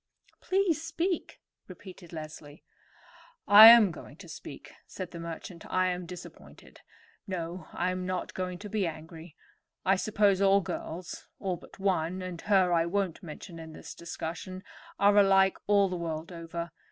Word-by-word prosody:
"Please 370 -5 +1
speak," 335 +2 -3 0.3
repeated 185 -1 -12
Leslie. 155 -2 -9 0.8
"I 210 +2 +11
am 230 -4 +9
going - - -11
to - - -13
speak," - - -10 0.2
said 185 -2 -7
the 170 - -8
merchant. 170 +1 -8
"I 185 0 +2
am 180 -1 -4
disappointed. 180 +1 -12 0.5
No, 175 -2 -5
I 180 +1 -1
am 185 0 -4
not 185 -1 -3
going 180 -1 -4
to 205 +3 -8
be 205 -3 -1
angry. 160 0 -9 0.5
I 195 0 +4
suppose 200 -1 +2 0.2
girls, 170 +1 -6
all 185 -2 -2
but - - -16
one, 185 -2 -1
and 180 -2 -6
her 190 -4 +3
I 165 0 +2
won't 190 -1 -2
mention 170 0 -9
in 160 -1 -9
this - - -10
discussion, 170 +2 -7 0.3
are 200 0 +4
alike 195 -1 +5
all 200 -1 +4
the 180 -1 -4
world 165 0 -5
over. 170 0 -6
185 Hz, 155 wpm, -29 LUFS, 170-195 Hz, 0.8 s, I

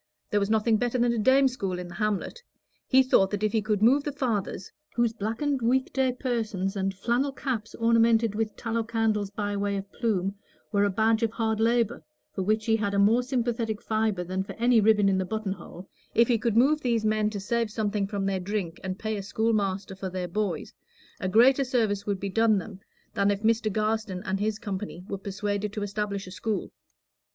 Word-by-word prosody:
There 210 - +3
was 200 0 -1
nothing 220 0 +3
better 245 +2 0
than 240 0 +2
a 235 - -1
dame 265 +5 +5
school 195 -8 -3
in 180 0 -6
the 175 - -10
hamlet; 210 - -2 0.5
he 265 0 +5
thought 195 -7 +4
that 205 +1 -3
if 215 - +2
he 220 - +1
could 210 -1 0
move 270 +5 +5
the 290 - -2
fathers, 225 -8 -2 0.2
whose 235 -1 +2
blackened 235 +6 -2
week 255 +3 +1
day 265 -1 +2
persons 220 -6 -2
and 195 0 0
flannel 240 +8 0
caps, 240 -5 -4
ornamented 230 -1 +3
with 215 0 -2
tallow 230 0 -1
candles 220 -3 0
by 205 0 -3
way 200 0 -1
of 195 0 -7
plume, 195 -5 -1 0.4
were 205 -1 +3
a - - +2
badge 220 +3 +2
of 230 - +2
hard 220 -2 -1
labor, 235 0 +1 0.3
for 195 - -3
which 215 +3 0
he 225 -1 +3
had 200 -2 -1
a - - +1
more 215 +5 +4
sympathetic 235 -4 -1
fibre 215 -4 0
than 185 +2 -2
for 190 - -6
any 240 -1 +3
ribbon 210 -1 +4
in 190 -1 +2
the - - +1
buttonhole 190 -3 -5 0.3
if 235 0 +5
he 235 -3 +2
could 230 -1 0
move 295 +5 +4
these 235 -4 0
men 215 0 +2
to 210 -1 -5
save 230 +3 -1
something 210 -2 -1
from 200 -1 -3
their 195 -1 0
drink 185 -3 -3
and 185 0 -3
pay 220 0 -3
a - - -3
school 220 +3 0
master 195 -2 -1
for 190 0 -5
their 180 -1 -4
boys, 185 -3 -3 0.5
a 185 - -2
greater 255 +7 +5
service 220 -6 0
would 200 -2 -1
be 200 - -3
done 220 +2 +3
them 190 +1 -6 0.3
than 200 0 +2
if 205 +1 -1
Mr. 220 -1 +2
Garstin 215 -3 -1
and 190 +1 -1
his 210 0 -1
company 195 -4 -5
were 195 - -4
persuaded 205 +1 -3
to 210 - -3
establish 200 -1 -3
a 185 - -10
school. 215 +2 -3
215 Hz, 215 wpm, -27 LUFS, 200-230 Hz, 0.5 s, dame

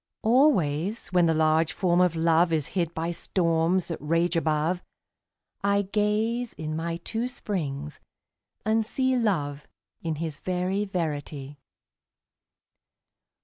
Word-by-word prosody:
Always 215 - +2
when 180 -2 +3
the 165 - +3
large 155 +1 +3
Form 180 -1 +2
of 180 -2 +3
Love 165 +1 +3
Is 155 -3 0
hid 170 -4 0
by 165 +1 -1
storms 170 0 +1
that 165 - -4
rage 165 +3 +1
above, 160 +2 +1 0.8
I 200 0 +3
gaze 215 +4 0
in 155 0 -4
my 165 +1 -2
two 225 +7 -3
springs 150 - -4 0.7
and 220 +1 +2
see 260 +4 +1
Love 150 - -1 0.3
in 165 -2 -2
his 155 -2 -5
very 185 +3 -1
verity. 145 -6 -4
170 Hz, 120 wpm, -26 LUFS, 155-200 Hz, 0.8 s, when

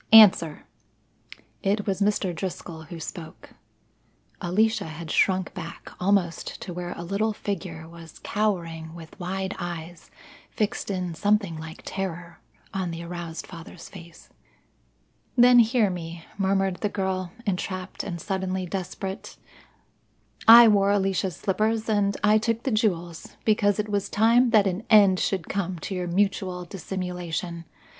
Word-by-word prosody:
"Answer!" 190 -8 +7 1.0
It 205 +1 0
was 195 -1 -1
Mr. 200 -3 +1
Driscoll 165 -2 -6
who 170 0 -8
spoke. 160 0 -8 0.9
Alicia 220 +6 +1
had 160 0 -7
shrunk 185 -2 +2
back, 170 -2 -8
almost 180 -3 0
to 180 - -6
where 175 0 -4
a 170 - -5
little 200 +5 0
figure 175 -6 -5
was 165 -1 -12
cowering 165 -6 -2
with 165 +2 -12
wide 190 +2 -3
eyes 175 -1 -6 0.4
fixed 215 0 -2
in 180 -3 -2
something 205 -1 +1
like 160 0 -9
terror 175 -3 -5 0.3
on 190 -2 -2
the 165 0 -5
aroused 170 -1 -6
father's 170 -1 -11
face. 170 -4 -13 1.1
"Then 245 0 +8
hear 230 -3 +4
me," 170 -1 -7
murmured 195 -1 +1
the 210 - -1
girl, 190 -3 -2
entrapped 185 -1 -3
and 175 -4 -5
suddenly 190 +1 -2
desperate. 190 +1 -5 1.1
"I 230 +1 +11
wore 200 -2 +4
Alicia's 195 -3 +1
slippers 215 +5 0
and 205 -2 +1
I 210 +1 +5
took 230 +1 -1
the 265 - -1
jewels, 175 -7 -1
because 205 -2 +3
it 210 0 -1
was 205 -1 -1
time 230 +4 +4
that 215 -3 +5
an 190 +2 -1
end 200 -4 +6
should 190 -5 -1
come 185 -2 -2
to - - -4
your 180 -1 -2
mutual 185 -1 0
dissimulation. 180 -2 -5
190 Hz, 135 wpm, -25 LUFS, 170-205 Hz, 1.1 s, I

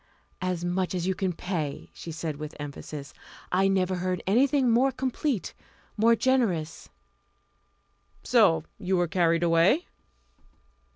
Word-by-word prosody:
"As 180 -1 -2
much 180 +1 -1
as 175 -1 -2
you 190 - +1
can 185 0 -1
pay," 165 -4 -4
she 165 - -8
said 155 -2 -4
with 150 0 -7
emphasis. 145 0 -7 0.4
"I 190 +2 +3
never 190 -1 +1
heard 180 0 -2
anything 260 +6 +3
more 255 +4 +4
complete, 260 - -2 0.4
more 230 +2 +4
generous." 220 -12 0 1.3
"So 80 -1 +4 0.2
you 185 +1 0
were 175 0 +2
carried 170 0 +2
away?" 170 - +3
185 Hz, 125 wpm, -27 LUFS, 165-220 Hz, 1.3 s, more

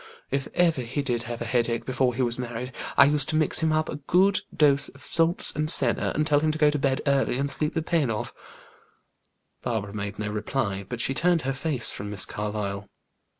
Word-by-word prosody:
If 135 0 -1
ever 165 -6 +3
he 130 +4 -3
did 120 -4 -1
have 120 0 -4
a - - -6
headache 120 -2 0
before 130 -1 0
he 130 - 0
was 120 0 -1
married, 125 +1 -5 0.3
I - - +9
used 145 +1 +2
to 155 - 0
mix 155 -1 +2
him 160 -1 +1
up 155 0 +1
a - - -5
good 185 +7 +2
dose 140 -2 +3
of 140 0 -16
salts 165 +3 +2
and 155 0 -1
senna, 125 -6 +2
and 155 - +1
tell 145 -2 +3
him 155 +1 +1
to 155 - -1
go 150 -1 +4
to 150 - -2
bed 135 0 0
early 140 -3 +2
and 140 +1 0
sleep 150 +2 -1
the 160 - 0
pain 160 -6 +1
off." 110 -1 -3 1.3
Barbara 105 -4 -3
made 100 -1 -5
no 105 0 -3
reply, 105 -2 -2
but 125 -2 -3
she 135 - 0
turned 170 +4 +2
her 135 +1 -1
face 135 -3 -1
from 105 +1 -6
Miss 100 -2 0
Carlyle. 105 -1 -4
135 Hz, 220 wpm, -26 LUFS, 115-155 Hz, 1.3 s, I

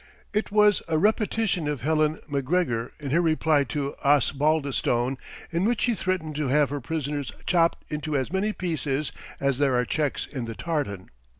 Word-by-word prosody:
It 210 +1 0
was 210 -1 +5
a 160 -1 +1
repetition 210 -2 +1
of 150 -3 -2
Helen 155 +2 +2
Macgregor, 140 -4 0
in 140 -3 -5
her 170 +4 +4
reply 155 -3 +3
to 140 +3 -3
Osbaldistone 140 -3 +2 0.3
in 170 +2 0
which 235 +2 +1
she 240 - +2
threatened 185 -6 -2
to 150 -2 0
have 145 +1 +3
her 145 -1 -3
prisoners 145 0 -3
"chopped 170 -2 +2
into 150 -1 -2
as 135 +5 -2
many 200 +3 +1
pieces 155 -7 -2 0.3
as 140 -1 +1
there 140 -3 +3
are 125 0 +2
checks 150 +2 -1
in 130 -5 -5
the 115 -1 -6
tartan." 145 - -3
150 Hz, 170 wpm, -26 LUFS, 140-170 Hz, 0.3 s, was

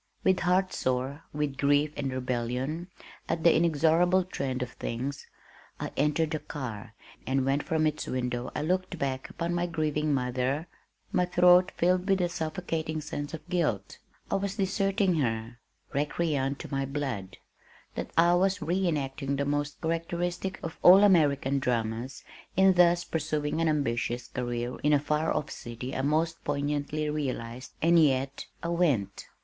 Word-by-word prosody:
With 190 -1 +3
heart 185 +1 +2
sore 130 +4 -2
with 145 -2 -2
grief 145 +1 +3
and 135 -2 -2
rebellion 130 +6 -2 0.4
at 165 0 -1
"the 170 - +6
inexorable 170 +3 +3
trend 135 -8 -3
of 125 - -7
things," 130 +4 -5 0.5
I - - -4
entered 150 +2 +1
the 155 - -1
car, 115 -8 -7 0.3
and 130 0 +1
when 135 +1 +2
from 155 +1 0
its 155 0 -1
window 125 -1 -2
I - - -1
looked 185 +2 -1
back 135 -3 -3
upon 170 +1 -3
my 175 0 0
grieving 155 -2 -1
mother, 130 +3 0 0.5
my 180 -1 +2
throat 180 +1 +5
filled 180 +2 +2
with 195 -1 +4
a 175 -1 +1
suffocating 160 -1 -3
sense 145 0 -5
of 155 -1 -12
guilt. 135 - -1 0.3
I - - +3
was 200 0 -3
deserting 195 -2 +1
her, 115 -3 -2 0.3
recreant 145 -1 0
to - - -9
my 135 0 0
blood! 130 -10 -4 0.6
That - - -4
I 170 +1 +6
was 190 +2 +2
re 185 +3 0
enacting 140 -3 -1
the 140 +1 -1
most 145 0 -2
characteristic 175 +3 -2
of 165 - -6
all 190 +3 +9
American 140 -8 +4
dramas 120 0 -2 0.3
in 190 0 +6
thus 175 -1 +4
pursuing 155 -1 -2
an 165 - +3
ambitious 120 -4 -1
career 120 -1 -3
in 150 +1 +2
a 145 - +5
far 150 +2 0
off 150 - -2
city 120 +3 -6
I - - 0
most 160 +4 0
poignantly 145 +1 -1
realized 130 -5 -4
and 165 0 +6
yet 135 -1 0 0.2
I 170 - -2
went! 145 - 0
150 Hz, 155 wpm, -28 LUFS, 135-170 Hz, 0.6 s, all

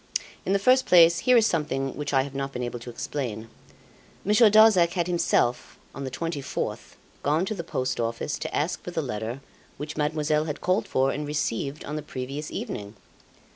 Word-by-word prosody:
In 195 - +2
the - - +4
first 255 +6 +3
place 170 -1 +7
here 250 - +8
is 225 - +5
something 145 - -1
which 145 - -4
I 135 -2 +3
have 140 0 -8
not 135 0 -3
been 125 -2 -4
able 120 0 -4
to 120 - -9
explain 115 -3 -5 0.8
Monsieur 210 +3 +6
Darzac 205 -5 +6
had 175 -3 0
himself, 170 -8 0 0.2
on 140 - -6
the - - -3
24th, 145 +1 -4 0.3
gone 155 +5 +1
to 215 - -2
the 180 -5 -5
Post 130 -6 -2
Office 115 +5 -2
to - - -4
ask 165 +5 -1
for - - -7
the 165 -3 -2
letter 115 +1 -4 0.4
which 150 +2 -6
Mademoiselle 150 0 +1
had 150 -2 -4
called 185 +3 0
for 135 +1 +2
and 150 0 -4
received 145 -1 -2
on 150 +2 -4
the - - -3
previous 140 +3 -6
evening. 105 +1 -6
150 Hz, 190 wpm, -26 LUFS, 130-170 Hz, 0.8 s, here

